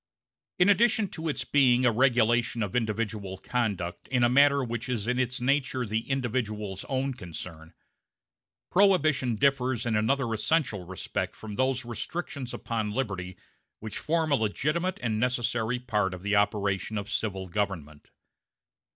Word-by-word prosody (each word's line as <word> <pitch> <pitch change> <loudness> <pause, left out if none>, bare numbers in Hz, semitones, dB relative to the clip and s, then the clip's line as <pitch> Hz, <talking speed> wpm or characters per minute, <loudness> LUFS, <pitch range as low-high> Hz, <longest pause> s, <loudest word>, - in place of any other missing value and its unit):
In 180 - +5
addition 220 0 +4
to 160 -1 -5
its 145 - -2
being 130 -3 +4
a 120 - +5
regulation 120 -1 +2
of 100 +1 -4
individual 110 -4 -2
conduct 100 -6 -2
in 125 -2 +1
a 120 - +5
matter 140 +2 +5
which 120 0 -4
is 115 -4 -1
in 125 +1 +1
its 125 -1 0
nature 130 -1 +1
the 110 +3 -3
individual's 110 -7 -2
own 135 0 -1
concern, 85 -5 -9 1.0
Prohibition 155 - +3
differs 130 -1 +1
in 115 -2 0
another 115 +2 +1
essential 110 - 0
respect 95 -1 -4
from 110 -1 -8
those 130 +2 0
restrictions 130 +2 -5
upon 110 -3 -3
liberty 95 -8 -3 0.4
which 110 -1 -6
form 160 -1 0
a - - +6
legitimate 150 - -1
and 110 -3 0
necessary 120 -1 0
part 105 -6 -1
of 90 - -12
the 105 +1 +1
operation 100 0 +1
of 100 0 -4
civil 95 -4 -2
government. 85 -6 -4
120 Hz, 145 wpm, -28 LUFS, 105-135 Hz, 1.0 s, a